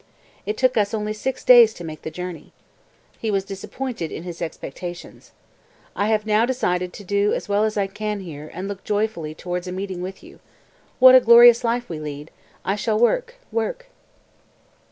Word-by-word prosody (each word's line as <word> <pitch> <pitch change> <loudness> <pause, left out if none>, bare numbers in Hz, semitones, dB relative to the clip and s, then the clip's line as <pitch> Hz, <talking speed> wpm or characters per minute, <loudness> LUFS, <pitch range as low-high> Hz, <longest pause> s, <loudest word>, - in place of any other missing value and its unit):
"It 210 +1 -2
took 255 -2 +2
us 210 +1 +1
only 210 0 -2
six 260 +5 -4
days 235 -3 +7
to 175 - -9
make 155 -2 -8
the - - -5
journey." 180 -1 -8 0.7
He 225 - -2
was 195 -2 0
disappointed 195 - -5
in 160 - -6
his 175 -1 -8
expectations. 175 +2 -8 0.6
"I 205 - 0
have 215 -1 +1
now 215 +1 +3
decided 180 -8 -1
to 205 - -10
do 200 +2 +1
as - - -5
well 205 +1 +1
as 215 -1 -1
I 200 - +2
can 210 +1 -4
here 155 -4 -9
and 185 +2 -6
look 200 -1 -7
joyfully 205 -7 -2
towards 180 +2 -5
a - - -4
meeting 185 -1 -5
with 190 +1 -7
you. - - -15 0.6
What 255 0 +8
a 260 - +10
glorious 235 0 +7
life 240 +1 -1
we 165 - -5
shall 155 - -8
lead; 150 +1 -7 0.3
I 195 - 0
shall 215 +1 -1
work 475 - +1 0.2
work!") - - -3
205 Hz, 190 wpm, -22 LUFS, 180-225 Hz, 0.7 s, a